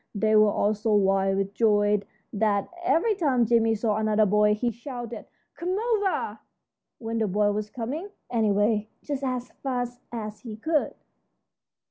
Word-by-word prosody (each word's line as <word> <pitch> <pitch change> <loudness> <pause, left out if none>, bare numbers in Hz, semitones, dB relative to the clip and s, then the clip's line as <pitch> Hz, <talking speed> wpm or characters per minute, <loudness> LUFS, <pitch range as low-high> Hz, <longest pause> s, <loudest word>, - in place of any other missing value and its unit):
They 215 +1 +2
were 215 0 +6
all 205 +1 +1
so 215 0 0
wild 195 -1 +2
with 195 0 -2
joy 205 -2 +3 0.3
that 205 -1 +1 0.2
every 365 +5 +3
time 275 - +2
Jimmie 225 -1 +3
saw 215 -1 0
another 215 0 +3
boy 210 +1 +3
he 240 +3 -1
shouted, 240 -2 -7 0.3
"Come 365 +3 -2
over!" 430 -3 0 0.6
when 225 -1 -3
the 220 - +1
boy 205 +2 +2
was 210 0 -3
coming, 275 - -5 0.2
anyway, 215 -1 +1
just 280 -2 -4
as 255 -2 -3
fast 245 -2 -3
as 215 -3 -5
he 225 -4 -8
could. 305 +5 0
220 Hz, 150 wpm, -26 LUFS, 210-250 Hz, 0.6 s, were